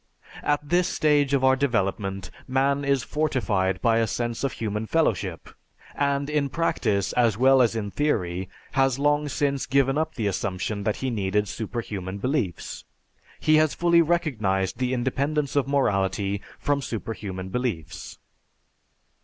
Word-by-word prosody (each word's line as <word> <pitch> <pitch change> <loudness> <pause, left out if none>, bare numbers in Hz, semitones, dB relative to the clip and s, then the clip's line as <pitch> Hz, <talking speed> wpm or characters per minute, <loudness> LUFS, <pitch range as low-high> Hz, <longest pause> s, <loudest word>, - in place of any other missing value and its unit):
At 145 0 0
this 175 +3 +2
stage 145 -3 +2
of 135 - 0
our 130 0 +5
development 100 -7 -1 0.2
man 135 +2 +1
is 140 -3 +1
fortified 110 -11 0
by 115 -1 +4
a 115 - +2
sense 120 +1 -3
of 135 -4 0
human 105 0 -3
fellowship, 105 - 0 0.5
and 140 0 0
in 150 -2 0
practice, 110 - 0
as 115 -4 +2
well 130 +2 +5
as 115 -2 +2
in 105 -3 -3
theory, 95 -11 -1 0.2
has 135 -2 +2
long 145 +1 +1
since 140 -2 -1
given 135 +1 +2
up 160 - -2
the 115 - -2
assumption 100 +1 -2
that 105 - +1
he 130 - 0
needed 105 -1 0
superhuman 100 -4 -5
beliefs. 120 - -2 0.6
He 155 0 +4
has 155 -1 +3
fully 170 -1 +4
recognized 115 - 0
the 125 -1 0
independence 140 +4 -1
of 140 -2 +2
morality 100 -7 0 0.2
from 145 -1 0
superhuman 100 -6 -5
beliefs. 95 -7 -4
125 Hz, 145 wpm, -25 LUFS, 100-140 Hz, 0.6 s, our